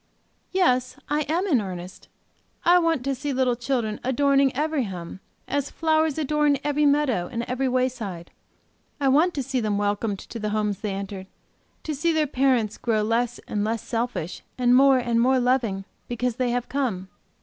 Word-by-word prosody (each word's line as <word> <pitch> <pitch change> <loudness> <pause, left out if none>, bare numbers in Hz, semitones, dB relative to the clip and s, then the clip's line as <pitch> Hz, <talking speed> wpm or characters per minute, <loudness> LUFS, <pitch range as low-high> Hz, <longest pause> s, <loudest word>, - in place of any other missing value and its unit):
"Yes, 255 -10 +2
I 295 0 0
am 345 +5 +1
in 280 - +3
earnest. 185 -2 -8 0.6
I 355 +1 +6
want 330 -6 +1
to 275 +1 0
see 280 +2 -3
little 255 -2 +1
children 235 -3 -2
adorning 275 +1 +3
every 300 -2 0
home, 180 -2 -7 0.3
as 285 0 -1
flowers 315 -2 +1
adorn 300 -1 +2
every 295 0 +2
meadow 275 -11 +1
and 235 0 -2
every 255 +2 -1
wayside. 245 -9 -2 0.7
I 275 -2 +2
want 320 +7 +3
to 275 - -1
see 265 0 -1
them 210 -3 0
welcomed 205 0 -1
to 230 - -8
the 210 -1 -2
homes 210 -2 -1
they 205 -3 -3
enter, 195 -1 -6 0.6
to 310 - -3
see 320 +4 +1
their 315 -1 +2
parents 255 -6 +1
grow 220 -3 +1
less 235 +2 0
and 205 -1 -1
less 225 +1 -2
selfish, 230 -7 -3 0.2
and 245 -1 +4
more 270 0 +6
and 235 -2 +1
more 260 +2 +4
loving, 240 -6 +1 0.2
because 245 0 -2
they 255 -1 +1
have 245 0 -1
come. 230 -9 -2
250 Hz, 175 wpm, -24 LUFS, 215-280 Hz, 0.7 s, I